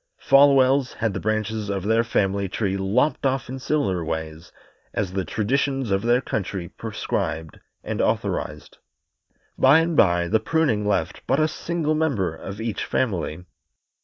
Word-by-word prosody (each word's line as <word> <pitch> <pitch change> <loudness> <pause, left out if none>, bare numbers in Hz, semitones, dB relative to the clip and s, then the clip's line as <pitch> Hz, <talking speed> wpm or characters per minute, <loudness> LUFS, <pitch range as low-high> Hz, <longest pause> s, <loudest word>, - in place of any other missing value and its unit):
Folwells 135 -1 +4
had 110 -3 -1
the - - -3
branches 110 0 -2
of 100 -2 -2
their 110 +3 +2
family 100 -4 0
tree 95 -1 -1
lopped 100 +10 +1
off 135 -1 0
in 130 +1 -5
similar 100 - 0
ways, 80 +1 -5 0.4
as 95 -3 -2
the 95 -1 -1
traditions 135 +3 -1
of 95 0 +2
their 120 +3 +2
country 95 -6 -4
prescribed 80 -1 -4 0.2
and - - -2
authorized. - - -2 0.8
By 135 +3 +7
and 165 0 0
by 85 -7 +3
the 110 +5 +2
pruning 110 -6 +1
left 105 - -1
but 135 - +2
a 155 - +3
single 160 0 -2
member 140 - 0
of 95 +5 -8
each 110 -2 -3
family. 90 -7 -2
110 Hz, 150 wpm, -23 LUFS, 95-135 Hz, 0.8 s, By